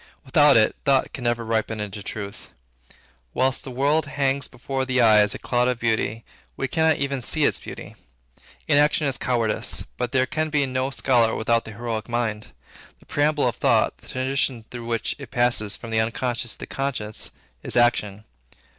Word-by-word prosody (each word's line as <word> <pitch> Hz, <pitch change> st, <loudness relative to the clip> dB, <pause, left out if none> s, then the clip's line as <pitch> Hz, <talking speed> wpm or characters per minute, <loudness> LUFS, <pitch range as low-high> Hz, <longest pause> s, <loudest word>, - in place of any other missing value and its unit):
Without 145 Hz, 0 st, +5 dB
it, 110 Hz, -, +3 dB
thought 135 Hz, -1 st, +2 dB
can 125 Hz, -, -6 dB
never 120 Hz, -1 st, 0 dB
ripen 110 Hz, -1 st, -1 dB
into 105 Hz, 0 st, -5 dB
truth. 100 Hz, -5 st, -7 dB, 0.9 s
Whilst 130 Hz, +1 st, +1 dB
the -, -, -7 dB
world 140 Hz, +4 st, +1 dB
hangs 140 Hz, -1 st, 0 dB
before 135 Hz, +1 st, -4 dB
the 130 Hz, 0 st, 0 dB
eye 110 Hz, -3 st, +6 dB
as 105 Hz, 0 st, +3 dB
a -, -, -4 dB
cloud 125 Hz, 0 st, 0 dB
of 125 Hz, -1 st, 0 dB
beauty, 110 Hz, -1 st, -1 dB, 0.3 s
we -, -, -1 dB
cannot 160 Hz, +2 st, +2 dB
even 140 Hz, -1 st, -2 dB
see 155 Hz, +5 st, 0 dB
its -, -, +3 dB
beauty. -, -, -9 dB, 0.7 s
Inaction 150 Hz, 0 st, +3 dB
is 135 Hz, -2 st, 0 dB
cowardice, 115 Hz, -4 st, +1 dB
but 125 Hz, -1 st, -2 dB
there 130 Hz, -2 st, +2 dB
can 155 Hz, +3 st, -2 dB
be 145 Hz, -2 st, +1 dB
no 130 Hz, 0 st, -1 dB
scholar 120 Hz, -4 st, +2 dB
without 115 Hz, +1 st, +1 dB
the 110 Hz, -, -8 dB
heroic 115 Hz, 0 st, -4 dB
mind. 115 Hz, -3 st, -2 dB, 0.5 s
The -, -, -22 dB
preamble 145 Hz, -1 st, +1 dB
of 120 Hz, -, -2 dB
thought, -, -, +2 dB
the -, -, -16 dB
transition 130 Hz, -2 st, -1 dB
through 120 Hz, -2 st, -7 dB
which 115 Hz, -2 st, -1 dB
it 140 Hz, -5 st, -9 dB
passes 120 Hz, -5 st, +2 dB
from 115 Hz, -, -9 dB
the 110 Hz, -, +2 dB
unconscious 120 Hz, +1 st, -2 dB
to -, -, -11 dB
the -, -, -4 dB
conscious, 125 Hz, -6 st, -4 dB, 0.3 s
is -, -, -3 dB
action. 110 Hz, -4 st, +2 dB
125 Hz, 180 wpm, -23 LUFS, 115-135 Hz, 0.9 s, eye